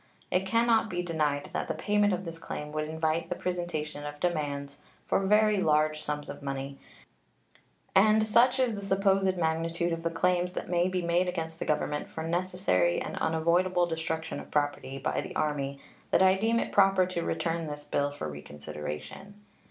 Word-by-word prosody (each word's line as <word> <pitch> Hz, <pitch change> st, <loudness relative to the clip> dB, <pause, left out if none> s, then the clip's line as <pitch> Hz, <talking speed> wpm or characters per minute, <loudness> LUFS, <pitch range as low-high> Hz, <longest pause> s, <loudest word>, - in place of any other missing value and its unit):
It 185 Hz, +1 st, +1 dB
can 230 Hz, +3 st, +3 dB
not 225 Hz, -2 st, +3 dB
be 175 Hz, -2 st, -2 dB
denied 150 Hz, -4 st, 0 dB
that -, -, -2 dB
the -, -, -2 dB
payment 210 Hz, 0 st, +2 dB
of 185 Hz, 0 st, -2 dB
this 165 Hz, -1 st, -7 dB
claim 150 Hz, -2 st, -6 dB
would 155 Hz, 0 st, -2 dB
invite 160 Hz, +1 st, -1 dB
the -, -, -1 dB
presentation 175 Hz, -5 st, -3 dB
of 145 Hz, 0 st, -7 dB
demands 145 Hz, -4 st, -2 dB, 0.3 s
for -, -, +2 dB
very 210 Hz, 0 st, +4 dB
large 155 Hz, -3 st, +2 dB
sums 150 Hz, -1 st, -4 dB
of -, -, -8 dB
money; 135 Hz, 0 st, -5 dB, 1.1 s
and 215 Hz, +2 st, +5 dB
such 240 Hz, +4 st, +4 dB
is 250 Hz, -3 st, +2 dB
the 205 Hz, -, -5 dB
supposed 195 Hz, -1 st, +2 dB
magnitude 165 Hz, +1 st, 0 dB
of 165 Hz, -, -3 dB
the 165 Hz, -, 0 dB
claims 180 Hz, +2 st, +1 dB
that -, -, -5 dB
may 175 Hz, 0 st, +3 dB
be 185 Hz, -1 st, -1 dB
made 170 Hz, +2 st, +2 dB
against 165 Hz, -2 st, -4 dB
the -, -, -3 dB
Government 150 Hz, -1 st, -1 dB
for 160 Hz, -, -5 dB
necessary 170 Hz, -, +1 dB
and -, -, -5 dB
unavoidable 175 Hz, +3 st, +2 dB
destruction 160 Hz, -1 st, -3 dB
of -, -, -10 dB
property 145 Hz, -2 st, -1 dB
by -, -, -1 dB
the -, -, -8 dB
Army 140 Hz, -2 st, -1 dB, 0.3 s
that -, -, +4 dB
I 190 Hz, 0 st, +6 dB
deem 225 Hz, +4 st, +1 dB
it -, -, -2 dB
proper 195 Hz, -2 st, +5 dB
to 180 Hz, -2 st, -3 dB
return 165 Hz, 0 st, -2 dB
this 145 Hz, 0 st, -6 dB
bill 145 Hz, -1 st, 0 dB
for 145 Hz, -, -5 dB
reconsideration. 75 Hz, -, -7 dB
165 Hz, 185 wpm, -29 LUFS, 150-185 Hz, 1.1 s, I